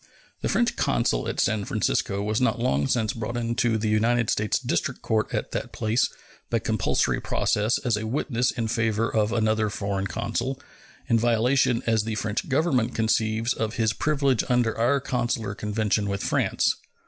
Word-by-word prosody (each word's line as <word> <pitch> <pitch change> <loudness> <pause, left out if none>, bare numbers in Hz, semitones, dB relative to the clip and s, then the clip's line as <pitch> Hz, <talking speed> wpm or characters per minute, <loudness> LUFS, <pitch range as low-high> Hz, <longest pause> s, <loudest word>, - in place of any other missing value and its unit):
The - - -1
French - - +1
consul - - 0
at - - -3
San 110 -1 +1
Francisco 100 -1 -1
was 105 +2 0
not 125 - +2
long 70 - +1
since 110 - 0
brought 115 +1 -4
into 115 -1 0
the 110 0 -1
United 115 +2 +2
States 105 -1 +1
district - - -2
court 110 -1 0
at - - -3
that - - -4
place 115 +2 +1 0.4
by - - +1
compulsory - - 0
process 105 +4 +1
as 120 -4 0
a 110 +1 -4
witness 125 0 0
in 115 -3 -2
favor 110 0 0
of 110 -1 +1
another 110 -1 +1
foreign 100 -1 -2
consul, 120 +5 -3 0.5
in 115 -1 +3
violation, 120 +2 +2
as 115 -2 +2
the 110 0 -3
French 105 +3 -2
Government 135 -5 +1
conceives, 110 +1 +1
of 110 0 -3
his 110 -2 +1
privileges 140 -4 +1
under 120 -2 +2
our 125 +5 +2
consular 120 -5 -2
convention 105 0 -1
with 100 0 -2
France. - - +1
110 Hz, 170 wpm, -25 LUFS, 110-120 Hz, 0.5 s, in